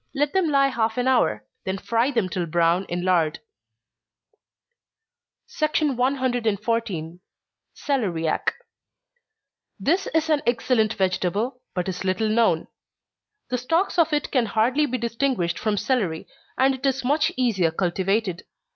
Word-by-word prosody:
Let 290 +1 0
them 380 -4 +2
lie 275 -1 +4
half 225 -3 -1
an 250 +1 0
hour 105 - +2 0.2
then 190 +1 -2
fry 230 +6 0
them 230 -8 0
till 180 -1 -3
brown 170 +3 +2
in 175 0 -3
lard. 165 -4 +2 2.2
114. 235 - 0 0.6
Celeriac. 190 - -1 1.3
This 350 - +1
is 320 0 0
an 295 -2 +3
excellent 230 -2 +1
vegetable, 195 +7 -1
but 180 0 -1
is 185 0 -4
little 190 +3 0
known. 215 -7 +2 0.8
The 250 - 0
stalks 330 +9 0
of 330 -1 +4
it 295 -1 -1
can 250 -4 +2
hardly 245 +8 +2
be 255 - -2
distinguished 230 -7 -1
from 215 -2 0
celery, 210 -8 -1 0.3
and 265 +1 +4
it 260 0 -8
is 265 -1 -1
much 295 +4 +2
easier 215 -10 +2
cultivated. 190 +2 -1
230 Hz, 130 wpm, -24 LUFS, 185-265 Hz, 2.2 s, lie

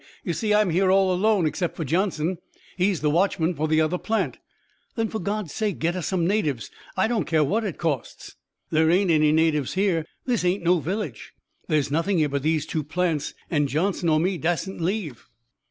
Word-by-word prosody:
"You 175 - -2
see, 215 +4 -1
I'm 210 -3 +3
here 185 +3 +2
all 190 -1 +4
alone, 200 -1 +2
except 160 +3 -2
for 160 - -4
Johnson. 170 +1 0 0.4
He's 185 -1 +1
the 150 - +2
watchman 175 0 +1
for 155 0 -1
the 155 0 +2
other 160 +3 0
plant." 225 0 -1 0.6
"Then 225 -1 -1
for 220 - -4
God's 200 -2 -3
sake 210 -4 -1
get 170 +2 0
us 180 -4 -3
some 180 -3 0
natives. 165 - -1 0.3
I 190 - +3
don't 225 -8 0
care 160 -2 +3
what 210 +10 0
it 195 -7 -4
costs." 150 -7 -4 0.4
"There 160 0 +3
ain't 180 +1 +3
any 155 -1 +4
natives 155 -3 +1
here. 185 -5 +1 0.2
This 245 -6 0
ain't 180 +1 +1
no 175 +1 +3
village. 165 - -4 0.3
There's 145 -3 +1
nothing 170 +5 +1
here 155 -2 +2
but 140 0 -1
these 155 0 +1
two 155 -1 -2
plants, 160 -1 -1 0.2
and 145 -4 +1
Johnson 175 +3 0
or 155 -1 +3
me 180 +1 0
dassent 175 +3 -2
leave." 170 - -3
175 Hz, 200 wpm, -24 LUFS, 155-195 Hz, 0.6 s, all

